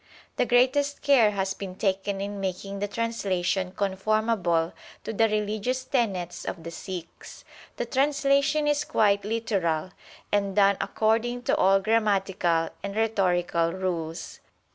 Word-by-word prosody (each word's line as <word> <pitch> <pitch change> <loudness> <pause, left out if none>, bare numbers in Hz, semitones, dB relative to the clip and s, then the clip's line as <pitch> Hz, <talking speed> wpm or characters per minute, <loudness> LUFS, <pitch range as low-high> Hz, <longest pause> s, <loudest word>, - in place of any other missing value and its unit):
The - - +2
greatest 270 +4 +2
care 265 -7 +5
has 195 -2 -1
been 190 -2 -7
taken 195 0 -1
in 200 0 -4
making 195 +1 -4
the 205 - -1
translation 190 -5 -1
conformable 195 -3 0 0.3
to - - -4
the 225 +1 +3
religious 215 +4 -1
tenets 200 -10 -1
of 165 - -5
the 170 - -6
Sikhs. 180 0 -9 0.3
The 240 - -2
translation 280 +3 +2
is 295 0 +2
quite 200 -2 +2
literal, 195 -7 -1 0.4
and 200 -2 0
done 200 -1 +4
according 230 +3 0
to - - +2
all 195 +1 +4
grammatical 195 -6 +1
and 200 +1 -5
rhetorical 180 -6 +1
rules. 170 -4 -4
200 Hz, 130 wpm, -26 LUFS, 185-230 Hz, 0.4 s, care